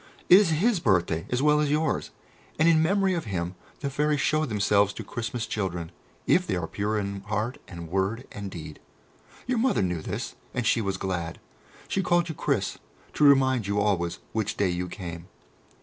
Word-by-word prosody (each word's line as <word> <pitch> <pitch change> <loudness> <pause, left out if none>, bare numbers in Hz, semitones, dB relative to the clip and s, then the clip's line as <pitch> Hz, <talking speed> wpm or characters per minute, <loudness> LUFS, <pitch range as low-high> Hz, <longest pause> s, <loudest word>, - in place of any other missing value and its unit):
It 185 - +10
is 205 -5 +3
His 190 +6 +2
birthday 90 - +1
as 125 +2 0
well 150 0 +5
as 150 -1 +1
yours, 150 +1 0 0.5
and 160 - +4
in 160 -1 +5
memory 195 +3 +2
of 170 -6 -2
Him 90 -3 -3 0.3
the 140 - -1
Fairies 150 +1 +1
show 155 +3 +2
themselves 105 -3 +2
to - - -7
Christmas 115 0 -4
children, 90 -5 -3 0.3
if 180 0 +3
they - - 0
are 90 -2 -2
pure 105 +5 -2
in 100 -1 -3
heart 110 +4 -2
and 85 -2 -8
word 95 +8 -1
and 100 -1 -6
deed. 80 -4 -8 0.7
Your 250 -1 0
Mother 250 - +2
knew 90 -3 -1
this, - - -4 0.2
and 125 - -1
she 115 0 +3
was 100 -2 -2
glad. 90 -4 -3 0.5
She 195 - 0
called 175 -2 +2
you - - -2
'Chris' - - -1 0.3
to - - 0
remind 130 -6 +5
you 100 0 0
always 95 -5 0
which 110 -2 -2
day 100 -2 +2
you 90 +1 -2
came." 85 -1 -7
105 Hz, 190 wpm, -27 LUFS, 95-150 Hz, 0.7 s, It